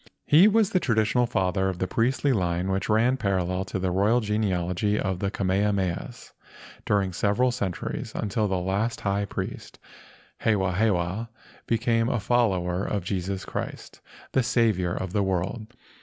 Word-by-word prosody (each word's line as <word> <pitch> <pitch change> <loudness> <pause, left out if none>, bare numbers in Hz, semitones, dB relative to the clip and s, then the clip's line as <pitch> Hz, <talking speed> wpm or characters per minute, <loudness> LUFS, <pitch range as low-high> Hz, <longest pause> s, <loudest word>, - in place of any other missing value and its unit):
He 165 +7 +7
was 215 -1 +3
the 185 - +3
tradi¬ 115 -9 +2
tional 120 +2 +1
father 95 -3 +1
of 95 - -4
the 95 - -1
priestly 130 +8 +1
line 90 -3 0
which 95 +1 -2
ran 115 +4 +3
parallel 95 -4 -1
to 95 - -4
the 95 -1 -1
royal 100 +6 +3
genealogy 105 -2 0
of 95 -1 -2
the 100 - -1
Kamehamehas 95 -2 -1 0.6
during 100 -3 +1
several 105 +8 +2
centuries 100 -8 -4
until 110 0 -1
the 95 -1 0
last 100 +6 -1
high 100 0 0
priest, - - -6 0.6
Hewahewa, 95 0 +1 0.4
became 115 0 +1
a 120 - 0
follower 95 -5 +1
of 100 -3 -2
Jesus 95 +1 -3
Christ— - - -6 0.3
the 130 - +3
Saviour 110 -7 +1
of 95 -1 -4
the 105 - +2
world. 95 +4 -2
100 Hz, 150 wpm, -26 LUFS, 95-115 Hz, 0.6 s, He